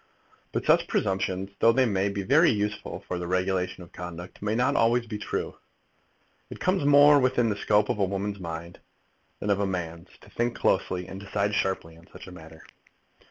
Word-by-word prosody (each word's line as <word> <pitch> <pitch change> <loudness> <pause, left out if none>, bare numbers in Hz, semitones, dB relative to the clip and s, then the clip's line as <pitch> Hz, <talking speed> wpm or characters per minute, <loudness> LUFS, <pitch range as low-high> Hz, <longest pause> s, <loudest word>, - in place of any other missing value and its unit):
But - - -3
such - - +4
presumptions, 95 0 -1
though 115 - +6
they 130 +2 +3
may 100 -3 0
be 100 0 -3
very 150 - +5
useful 105 -1 -2
for 90 - -3
the 90 - -4
regulation 95 0 -1
of 85 - -16
conduct, 90 0 -9
may 105 +1 -1
not 125 - +2
be - - -1
always 120 +1 +2
true. 105 -2 -4 0.9
It - - -9
comes 185 -3 +1
more 145 0 +7
within 125 -3 +2
the 105 - -1
scope 105 0 +2
of - - -2
a 100 - +3
woman's 100 +1 -3
mind, 85 -1 -7 0.6
than 105 - -4
that - - +5
of 100 - -3
a 100 - 0
man's, 85 -1 -5
to - - -17
think 120 +2 -1
closely 90 0 0
and 95 0 -8
decide 100 +1 -2
sharply 95 -5 -2
on 85 +2 -19
such - - -11
a 95 - -11
matter. 80 -2 -13
100 Hz, 200 wpm, -26 LUFS, 90-110 Hz, 0.9 s, more